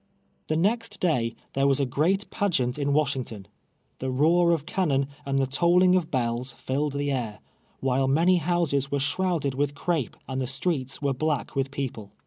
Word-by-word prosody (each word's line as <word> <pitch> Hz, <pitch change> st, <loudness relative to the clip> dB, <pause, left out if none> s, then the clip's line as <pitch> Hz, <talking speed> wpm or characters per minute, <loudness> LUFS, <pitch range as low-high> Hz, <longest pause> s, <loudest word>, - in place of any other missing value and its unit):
Tlie 155 Hz, -, +1 dB
next 210 Hz, +3 st, 0 dB
day 125 Hz, -10 st, +1 dB, 0.2 s
there 135 Hz, +1 st, +2 dB
was 135 Hz, 0 st, +2 dB
a 140 Hz, -, +2 dB
great 170 Hz, -, +1 dB
pageant 150 Hz, -, 0 dB
in 140 Hz, 0 st, 0 dB
Wash 145 Hz, -1 st, +2 dB
ington. 115 Hz, -6 st, -6 dB, 0.5 s
Tlie 130 Hz, -1 st, -2 dB
roar 170 Hz, +3 st, +4 dB
of 160 Hz, -4 st, 0 dB
cannon 145 Hz, -8 st, +1 dB, 0.2 s
and 135 Hz, 0 st, +1 dB
the 135 Hz, -, +3 dB
tolling 175 Hz, +7 st, +4 dB
of 180 Hz, -4 st, +1 dB
hells 120 Hz, 0 st, -1 dB
tilled 140 Hz, +2 st, -1 dB
the 145 Hz, 0 st, -1 dB
air, 115 Hz, -6 st, -2 dB, 0.4 s
while 135 Hz, 0 st, +1 dB
many 170 Hz, +7 st, +4 dB
houses 160 Hz, -5 st, +1 dB
Vv'ere 140 Hz, 0 st, -1 dB
shrouded 150 Hz, 0 st, 0 dB
with 145 Hz, +1 st, -1 dB
crape, 160 Hz, -6 st, -1 dB
and 130 Hz, 0 st, -2 dB
the 130 Hz, -, -2 dB
streets 135 Hz, -3 st, -2 dB
were 140 Hz, -1 st, +2 dB
black 150 Hz, +2 st, -2 dB
with 135 Hz, 0 st, 0 dB
people. 125 Hz, -7 st, -5 dB
140 Hz, 180 wpm, -26 LUFS, 130-170 Hz, 0.5 s, roar